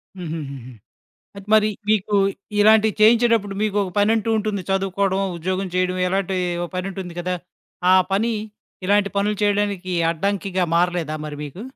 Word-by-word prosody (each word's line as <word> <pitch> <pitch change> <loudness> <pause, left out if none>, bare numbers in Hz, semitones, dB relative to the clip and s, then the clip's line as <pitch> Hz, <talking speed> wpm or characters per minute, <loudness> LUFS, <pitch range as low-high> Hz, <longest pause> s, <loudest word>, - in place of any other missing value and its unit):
హ్మ్. 175 -4 -6
హ్మ్. 155 -3 -4
హ్మ్. 135 -3 -8
హ్మ్. 125 -3 -12 0.6
అయితే 200 0 -11
మరి, 215 0 +5 0.2
మీకు 210 -1 +2 0.4
ఇలాంటియి 215 0 +5
చేయించేటప్పుడు 225 -2 +4
మీకు 210 -1 0
ఒక 185 - -5
పనంటూ 220 +1 +2
ఉంటుంది. 210 -2 -2
చదువుకోడమో, 195 0 0
ఉద్యోగం 185 +3 -2
చేయడమో 185 0 0
ఇలాంటి 190 0 -1 0.3
ఓ - - -1
పనుంటుంది 185 -1 -5
కదా! 180 +1 -2 0.6
ఆ - - +7 0.2
పని, 225 +4 +1 0.5
ఇలాంటి 200 0 +3
పనులు 205 0 0
చేయడానికి 200 -3 0 0.2
అడ్డంకిగా 190 +1 -1
మారలేదా 170 -3 0
మరి 150 -1 -6
మీకు? 150 +8 -8
195 Hz, 150 wpm, -21 LUFS, 180-205 Hz, 0.6 s, ఆ